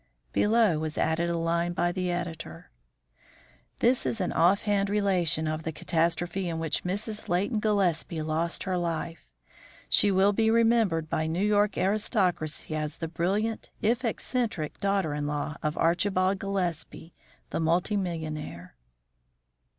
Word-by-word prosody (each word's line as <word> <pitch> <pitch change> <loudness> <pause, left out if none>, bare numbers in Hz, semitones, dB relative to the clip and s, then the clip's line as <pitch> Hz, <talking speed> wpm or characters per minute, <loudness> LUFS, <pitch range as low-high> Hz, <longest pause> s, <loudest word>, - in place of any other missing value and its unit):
Below 210 -6 +3
was 155 0 -4
added 165 +2 +1
a 170 - 0
line 170 +1 0
by 175 0 +1
the 180 0 -2
editor: 170 - -5 1.1
This 245 +2 +3
is 230 - -2
an 185 - -1
offhand 200 +3 +2
relation 185 -6 +1
of 155 0 -2
the 160 - -3
catastrophe 170 +3 -1
in 165 - -3
which 160 -2 -1
Mrs. 210 +4 -3
Leighton 200 +6 +1
Gillespie 180 -6 0
lost 160 +2 -1
her 185 -2 -1
life. 165 - -4 0.6
She 205 - +5
will 195 +1 +4
be 220 +2 +2
remembered 225 -8 +3
by 155 0 -1
New 175 +5 0
York 210 -1 +2
aristocracy 185 -7 0
as 150 -1 -3
the 165 - -4
brilliant, 200 +7 -1
if 235 +3 +1
eccentric, 225 - -2
daughter 195 -6 0
in 145 0 -2
law 150 +1 -3
of 150 0 -2
Archibald 185 +3 +2
Gillespie, 175 -4 -3 0.4
the - - -1
multi 170 +6 +1
millionaire. 155 - -4
175 Hz, 140 wpm, -28 LUFS, 160-205 Hz, 1.1 s, She